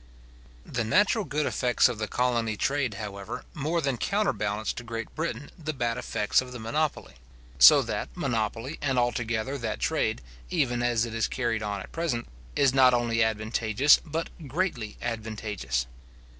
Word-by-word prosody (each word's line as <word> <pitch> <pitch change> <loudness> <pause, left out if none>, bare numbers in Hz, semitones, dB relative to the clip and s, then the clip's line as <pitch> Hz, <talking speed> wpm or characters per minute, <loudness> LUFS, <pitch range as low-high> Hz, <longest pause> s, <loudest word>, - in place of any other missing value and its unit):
The 115 - -2
natural 205 - +3
good 150 -1 -1
effects 125 0 +3
of 120 -3 -4
the 110 - -1
colony 120 -3 0
trade, 135 -2 0
however, 100 -2 -6
more 160 +4 -1
than 135 -4 0
counterbalance 110 - 0
to 120 - -7
Great 115 -1 -6
Britain 145 -4 -4
the 155 +1 -2
bad 120 -2 0
effects 105 -3 +1
of 130 -1 -9
the 125 - -6
monopoly; 140 - -2 0.4
so - - +9
that, - - -3
monopoly 115 +5 -2
and 135 -3 0
altogether, 120 +2 0
that 115 -3 -3
trade, 60 - 0 0.3
even 120 - 0
as 120 -1 +2
it 115 - -7
is 115 0 +1
carried 115 -4 -1
on 100 -2 -3
at - - -10
present, 155 -9 -2 0.3
is 135 -2 +4
not 130 -2 +6
only 120 -1 +1
advantageous, 110 +4 +3
but 165 +1 -4 0.2
greatly 130 - -2
advantageous. 105 - -3
120 Hz, 155 wpm, -27 LUFS, 110-135 Hz, 0.4 s, so